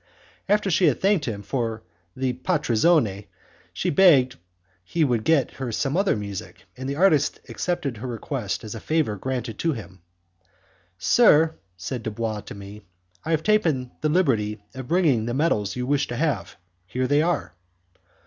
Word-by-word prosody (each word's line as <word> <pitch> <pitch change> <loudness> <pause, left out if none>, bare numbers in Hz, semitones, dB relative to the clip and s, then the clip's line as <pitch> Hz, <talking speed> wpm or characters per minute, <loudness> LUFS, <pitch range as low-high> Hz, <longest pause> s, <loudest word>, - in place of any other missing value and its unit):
After 205 -1 +2
she 175 +1 +4
had 140 - +2
thanked 195 -6 +2
him 105 -4 -4
for 115 -3 -3 0.3
the 130 -1 -1
'partizione', 125 - +1 0.4
she - - -1
begged 140 -7 +5 0.5
he 160 - 0
would 120 -6 +1
get 155 -3 +2
her 125 -3 -2
some 135 +6 -1
other 195 +1 +2
music, 100 -3 -7
and 130 +1 -5
the 140 - -2
artist 155 -4 +3
accepted 145 -9 -2
her 125 +4 -6
request 120 -2 -4
as 110 - -6
a 115 - -6
favour 155 -8 0
granted 120 +1 -4
to 165 -1 +1
him. 95 -7 -10 1.0
"Sir," 160 - +5 0.2
said 110 +7 -4
Dubois 110 -1 -3
to - - -7
me, 100 +1 -10 0.4
"I - - -6
have 160 -1 +1
taken 160 -13 +1
the 155 - +1
liberty 115 - +1
of 130 -1 -7
bringing 145 -10 +2
the 120 - -2
medals 120 - +1
you 125 0 -2
wished 140 +1 0
to 120 - -3
have; 140 - -1 0.3
here 125 +7 -1
they 145 +3 +3
are." 170 -1 -1
130 Hz, 165 wpm, -24 LUFS, 110-160 Hz, 1.0 s, begged